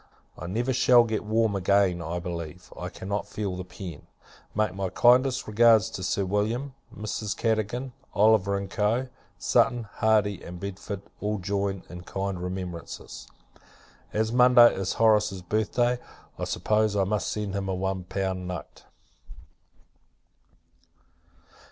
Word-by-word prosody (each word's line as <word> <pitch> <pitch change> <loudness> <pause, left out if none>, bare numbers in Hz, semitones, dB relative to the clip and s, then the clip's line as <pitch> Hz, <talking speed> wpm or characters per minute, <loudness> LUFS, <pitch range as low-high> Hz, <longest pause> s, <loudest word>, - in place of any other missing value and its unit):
I 85 - -7
never 120 +8 -1
shall 125 -1 +6
get 110 -2 -2
warm 110 -1 +1
again, 95 -2 +2
I 85 +2 -3
believe. 85 -1 -6
I - - -5
cannot 100 +2 -4
feel 100 -2 -3
the 90 - -5
pen. 90 -3 -9 0.5
Make 105 -2 +1
my 95 0 -2
kindest 125 +6 +4
regards 110 0 +5
to - - -6
Sir 95 +1 0
William, 110 +8 -1 0.2
Mrs. 105 0 -4
Cadogan, 115 +3 -1 0.2
Oliver, 100 -2 +3
&c. 110 +7 0 0.3
Sutton, 120 -1 +2
Hardy, 105 -2 +2
and 90 0 -9
Bedford, 100 +1 -6 0.2
all 105 +1 -1
join 100 0 -2
in 90 0 -9
kind 95 0 -4
remembrances. 90 -2 -6 0.8
As 110 +1 0
Monday 125 -1 +7
is 95 -1 -2
Horace's 105 -4 +2
birth 105 +4 -1
day, 120 0 +2 0.4
I - - -1
suppose 110 -1 +1
I 100 - +3
must 105 +2 -1
send 105 -2 -3
him 100 -1 -2
a 95 - 0
one 95 0 -2
pound 95 -1 -3
note. 90 -5 -7
100 Hz, 135 wpm, -27 LUFS, 95-110 Hz, 0.8 s, Monday